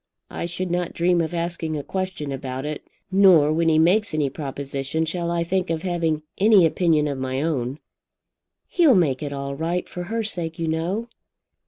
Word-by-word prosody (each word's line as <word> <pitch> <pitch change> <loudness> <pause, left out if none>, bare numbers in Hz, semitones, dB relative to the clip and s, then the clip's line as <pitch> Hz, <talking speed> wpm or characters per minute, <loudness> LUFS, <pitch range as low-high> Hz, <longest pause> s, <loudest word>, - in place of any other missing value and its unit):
I - - -4
should 175 +1 -4
not 175 -1 -1
dream 175 0 +2
of 165 +1 -3
asking 170 -2 -2
a 145 - -4
question 185 -6 -4
about 130 0 -5
it. 150 0 -4 0.3
Nor 180 -6 +6
when 165 +1 +2
he 155 - +3
makes 180 +3 +3
any 145 -3 0
proposition 140 +1 -3
shall 170 +1 -2
I 170 0 0
think 185 +1 -1
of 165 -1 -2
having 165 -4 -1 0.2
any 205 -3 +6
opinion 160 -2 +2
of 140 -2 -3
my 130 0 -2
own." 135 -4 -1 0.9
"He'll 320 -8 +4
make 145 -8 +2
it 145 -1 -4
all 140 0 -4
right; 170 +4 -2
for 175 0 -6
her 225 +4 -2
sake, 170 -6 -2
you 165 -1 -2
know." 175 +8 -1
165 Hz, 185 wpm, -23 LUFS, 150-180 Hz, 0.9 s, Nor